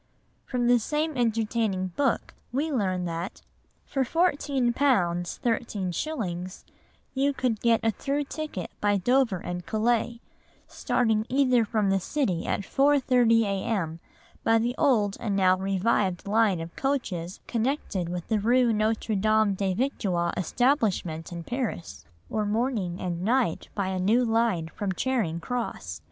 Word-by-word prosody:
From 245 -1 -1
the 245 0 +5
same 300 +6 -1
entertaining 220 -5 0
book 265 +7 -1 0.2
we 290 +6 -1
learn 185 -8 0
that, 170 +2 -5 0.4
"For 270 - 0
£4, 335 +7 +2 0.4
13s. 190 - -1 0.5
you 275 +1 +1
could 250 -5 -1
get 230 -1 +3
a 225 - +3
through 280 +7 -2
ticket 290 - -5
by 205 -1 +3
Dover 245 0 +2
and 175 +1 -5
Calais, 235 +1 0 0.5
starting 220 -2 0
either 255 -3 +3
from 215 -2 0
the 195 - +2
City 190 - -1
at - - 0
4.30 255 -5 +3
a.m. 195 -5 -2 0.4
by 225 - +4
the 235 +2 0
old 215 -9 +2
and 210 -4 -1
now 185 -1 +4
revived 195 0 0
line 210 -3 +3
of 165 +1 -7
coaches 195 -11 -2
connected 230 - -1
with 175 -1 -5
the 220 -2 +1
rue 240 +2 +3
Notre 220 +1 0
Dame 215 0 +3
des 190 -1 -1
Victoires 190 -8 0
establishment 190 - 0
in 170 -1 -6
Paris, 240 -6 -4 0.2
or 215 - -1
morning 210 -5 -1
and 175 -2 -3
night 230 -3 0
by 195 -2 -1
a 190 -1 -2
new 225 +7 +3
line 225 -7 +1
from 200 -2 -2
Charing 210 -8 -1
Cross. 170 - -4
220 Hz, 140 wpm, -27 LUFS, 185-245 Hz, 0.5 s, the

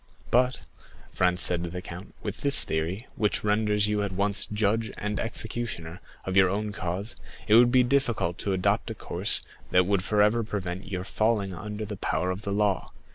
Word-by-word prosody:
"But," 125 +2 +4
said - - -15 0.5
Franz 90 0 +3
to 90 - +1
the 85 +1 -4
count, 90 +2 -9
"with 105 -1 -4
this 140 0 +4
theory, 85 +9 -2
which 105 -1 0
renders 105 0 +2
you 105 -1 0
at 100 -1 -2
once 100 +1 0
judge 110 +1 +1
and 105 0 -3
executioner 110 -7 -4 0.2
of 95 - -2
your 95 -2 +6
own 105 +2 -2
cause, 95 +3 -4 0.3
it 105 - +3
would 120 +2 +7
be 130 0 +5
difficult 120 -9 0
to 100 - -1
adopt 90 -1 +1
a - - -4
course - - 0 0.3
that 90 0 +4
would 100 -1 +1
forever 105 +3 +3
prevent 95 -4 -4
your 90 -1 -2
falling 105 -1 0
under 105 +4 -5
the - - -6
power 90 +4 -1
of 90 +2 -5
the 100 - -4
law. 100 -2 0
105 Hz, 185 wpm, -27 LUFS, 90-110 Hz, 0.5 s, would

